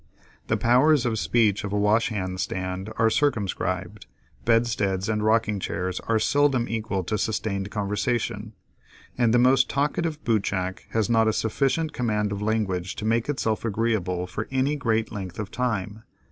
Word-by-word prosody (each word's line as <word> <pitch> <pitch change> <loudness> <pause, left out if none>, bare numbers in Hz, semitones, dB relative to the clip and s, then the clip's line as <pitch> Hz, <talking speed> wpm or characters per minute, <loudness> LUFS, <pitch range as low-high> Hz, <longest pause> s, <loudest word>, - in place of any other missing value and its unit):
The - - +1
powers 130 +4 +4
of 110 -3 0
speech 110 -3 +2
of 100 - -4
a 105 - 0
washhand 105 -3 +1
stand 95 +3 -3
are 115 0 +3
circumscribed, 100 -7 -1 0.4
bedsteads 110 -5 +1
and 105 -1 0
rocking 110 -1 +2
chairs 90 0 -3
are 115 - +3
seldom 130 +1 +2
equal 110 -4 -2
to 100 - -4
a - - +2
sustained 100 -3 -2
conversation, 105 +1 -2 0.6
and 120 -2 +2
the 120 - +4
most 125 +1 +4
talkative 150 +2 -1
bootjack 95 -5 -1
has 110 -2 0
not 115 -1 +3
a 110 - +2
sufficient 140 +9 0
command 105 -4 0
of 100 0 -4
language 100 -4 -1
to 105 - -5
make 115 +3 +1
itself 110 -6 -1
agreeable 105 -5 -1
for 105 +4 -5
any 135 +2 +1
great 115 -6 0
length 95 -4 -6
of 105 -3 -5
time. 110 -4 -2
110 Hz, 160 wpm, -25 LUFS, 100-120 Hz, 0.6 s, powers